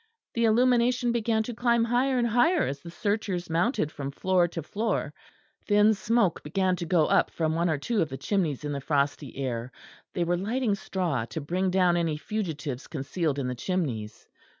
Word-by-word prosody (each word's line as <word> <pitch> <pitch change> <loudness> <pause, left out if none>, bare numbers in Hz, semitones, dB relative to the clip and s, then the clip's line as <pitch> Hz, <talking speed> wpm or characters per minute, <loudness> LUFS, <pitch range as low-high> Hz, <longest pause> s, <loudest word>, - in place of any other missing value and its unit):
The 230 0 +1
illumination 245 +1 +3
began 225 -1 +1
to 240 - -5
climb 235 0 +2
higher 250 +3 +1
and 240 - +2
higher 305 +10 +3
as 140 +1 -3
the 170 - -10
searchers 195 -2 -2
mounted 170 - +1
from 140 -2 -5
floor 180 +4 +2
to 165 -2 -6
floor; 205 -4 -2 0.5
thin 210 +1 +5
smoke 210 -2 +1
began 185 +4 0
to 170 - -4
go 165 -3 +3
up - - +3
from 160 -1 -1
one 170 +2 +1
or 155 - +1
two 215 +10 -1
of 160 - 0
the 135 - -5
chimneys 165 - -1
in 145 - -3
the 140 -1 -3
frosty 140 -2 -1
air; 125 -2 -3 0.4
they 175 - +1
were 175 +1 +1
lighting 220 +4 0
straw 180 - -2
to 160 - -5
bring 180 +6 -1
down 180 -2 +3
any 165 -3 0
fugitives 150 - -4
concealed 150 +1 -2
in 140 - -2
the 125 - -2
chimneys. 120 - -3
180 Hz, 190 wpm, -27 LUFS, 150-220 Hz, 0.5 s, thin